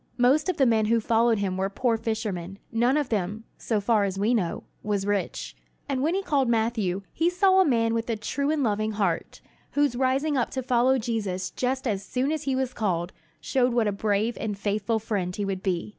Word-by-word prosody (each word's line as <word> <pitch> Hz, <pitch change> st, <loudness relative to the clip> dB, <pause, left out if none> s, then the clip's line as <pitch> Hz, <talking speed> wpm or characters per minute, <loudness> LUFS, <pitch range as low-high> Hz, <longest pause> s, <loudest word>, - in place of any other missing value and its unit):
Most 265 Hz, +8 st, +3 dB
of 365 Hz, -, -1 dB
the 270 Hz, -, +4 dB
men 225 Hz, -3 st, +3 dB
who 230 Hz, +2 st, +3 dB
followed 230 Hz, +1 st, +2 dB
him 190 Hz, -2 st, -1 dB
were 190 Hz, +1 st, 0 dB
poor 230 Hz, +3 st, +1 dB
fishermen. 210 Hz, -5 st, -3 dB
None 240 Hz, +5 st, +2 dB
of 290 Hz, -4 st, -1 dB
them, 210 Hz, +1 st, -2 dB, 0.2 s
so 220 Hz, -3 st, 0 dB
far 210 Hz, 0 st, +2 dB
as 195 Hz, -1 st, -2 dB
we 210 Hz, +5 st, +2 dB
know, 185 Hz, -8 st, -1 dB, 0.2 s
was 205 Hz, -2 st, -1 dB
rich. 205 Hz, -1 st, -2 dB, 0.3 s
And 270 Hz, -2 st, -1 dB
when 320 Hz, +6 st, +1 dB
he 390 Hz, -, -1 dB
called 275 Hz, -8 st, +1 dB
Matthew 220 Hz, -5 st, 0 dB
he 330 Hz, +2 st, +2 dB
saw 380 Hz, +1 st, +4 dB
a -, -, +4 dB
man 230 Hz, -4 st, +2 dB
with 230 Hz, +1 st, -2 dB
a 230 Hz, -, +1 dB
true 280 Hz, +7 st, -2 dB
and 305 Hz, -2 st, +1 dB
loving 215 Hz, -1 st, 0 dB
heart, 195 Hz, -5 st, -2 dB, 0.3 s
whose 285 Hz, -4 st, +2 dB
rising 270 Hz, +4 st, +1 dB
up 245 Hz, -3 st, +1 dB
to 260 Hz, -, -1 dB
follow 255 Hz, +1 st, +3 dB
Jesus 200 Hz, -6 st, -2 dB
just 260 Hz, +4 st, -1 dB
as 200 Hz, -3 st, -1 dB
soon 260 Hz, +7 st, -1 dB
as 310 Hz, -1 st, -3 dB
he 270 Hz, -1 st, 0 dB
was 260 Hz, -1 st, -1 dB
called 180 Hz, -5 st, -1 dB, 0.3 s
showed 250 Hz, -2 st, +1 dB
what 235 Hz, -2 st, +3 dB
a -, -, +2 dB
brave 210 Hz, +3 st, 0 dB
and 210 Hz, -2 st, -3 dB
faithful 205 Hz, +2 st, 0 dB
friend 200 Hz, -5 st, -2 dB
he 205 Hz, -, -2 dB
would 195 Hz, -1 st, -3 dB
be. 185 Hz, -1 st, -1 dB
225 Hz, 220 wpm, -26 LUFS, 200-260 Hz, 0.3 s, the